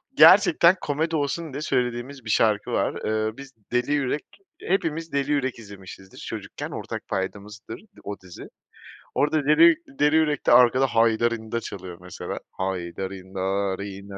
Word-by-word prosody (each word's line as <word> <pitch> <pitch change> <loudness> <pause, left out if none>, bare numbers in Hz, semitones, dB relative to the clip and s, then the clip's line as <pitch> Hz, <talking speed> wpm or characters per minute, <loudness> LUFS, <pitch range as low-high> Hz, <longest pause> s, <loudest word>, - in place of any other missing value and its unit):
gerçekten 190 - +7
komedi 160 +3 -1
olsun 150 +1 -2
diye 145 - -5
söylediğimiz 125 -1 -2
bir 110 - -6
şarkı 105 -1 +2
var. - - 0
Eee, 110 +1 -1
biz 135 0 -10 0.2
Deli 125 +3 0
Yürek 145 0 -1 0.4
hepimiz 165 -3 -1
Deli 140 +1 -1
Yürek 130 -4 -1
izlemişizdir 95 -2 -12
çocukken. - - -7
Ortak - - -6
paydamızdır 105 +3 -5 0.2
o 100 0 -5
dizi. 90 -2 -11 0.7
Orda 150 0 +1
Deli 320 - +6 0.2
Deli 150 +1 +4
Yürek'te 150 -3 +2
arkada 125 +2 +6
Haydarinda 115 -1 +1
çalıyor 95 -4 -8
mesela. 90 0 -6
Haydarinna 95 +1 -3
rinna 100 0 -8
115 Hz, 130 wpm, -24 LUFS, 100-145 Hz, 0.7 s, gerçekten